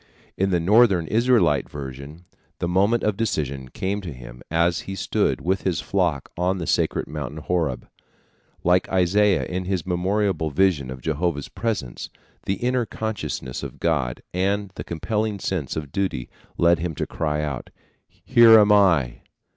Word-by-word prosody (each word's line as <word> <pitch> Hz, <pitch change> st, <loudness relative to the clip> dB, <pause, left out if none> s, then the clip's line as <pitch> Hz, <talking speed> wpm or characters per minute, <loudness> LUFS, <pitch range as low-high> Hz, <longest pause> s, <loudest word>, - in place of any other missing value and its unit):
In 95 Hz, +1 st, +1 dB
the 90 Hz, -2 st, +2 dB
Northern 100 Hz, -1 st, +4 dB
Israelite 110 Hz, -, +2 dB
version 70 Hz, +4 st, -8 dB, 0.3 s
the -, -, -2 dB
moment 100 Hz, +6 st, +2 dB
of 105 Hz, -2 st, +1 dB
decision 70 Hz, -, -2 dB
came 100 Hz, -, -3 dB
to 90 Hz, -4 st, -6 dB
him 60 Hz, -1 st, -11 dB
as 85 Hz, +1 st, +2 dB
he 95 Hz, -, -4 dB
stood -, -, 0 dB
with 95 Hz, +6 st, 0 dB
his 90 Hz, -5 st, -1 dB
flock 85 Hz, -8 st, -1 dB
on 90 Hz, +2 st, 0 dB
the 85 Hz, -, -4 dB
sacred -, -, 0 dB
mountain 75 Hz, -1 st, -6 dB
Horeb. 80 Hz, -4 st, -2 dB, 0.8 s
Like 90 Hz, +1 st, +3 dB
Isaiah 95 Hz, +2 st, +3 dB
in 90 Hz, 0 st, -4 dB
his 95 Hz, -3 st, -2 dB
memorable 95 Hz, -2 st, 0 dB
vision 75 Hz, -4 st, +1 dB
of 65 Hz, 0 st, -7 dB
Jehovah's 80 Hz, -1 st, -1 dB
presence, 100 Hz, -, -3 dB, 0.4 s
the 95 Hz, -, +1 dB
inner 125 Hz, +2 st, 0 dB
consciousness 105 Hz, -, -4 dB
of -, -, -8 dB
God 75 Hz, -8 st, -1 dB
and 100 Hz, +2 st, 0 dB
the -, -, -6 dB
compelling 105 Hz, +5 st, -2 dB
sense 90 Hz, -7 st, -3 dB
of 75 Hz, -3 st, -5 dB
duty 95 Hz, -11 st, -2 dB, 0.3 s
led 85 Hz, 0 st, +4 dB
him 80 Hz, -1 st, -3 dB
to -, -, -2 dB
cry 75 Hz, -1 st, -2 dB
out: 70 Hz, -5 st, -4 dB, 0.4 s
"Here 115 Hz, -1 st, +6 dB
am 105 Hz, 0 st, +5 dB
I." 85 Hz, -12 st, +3 dB
90 Hz, 155 wpm, -23 LUFS, 75-100 Hz, 0.8 s, Here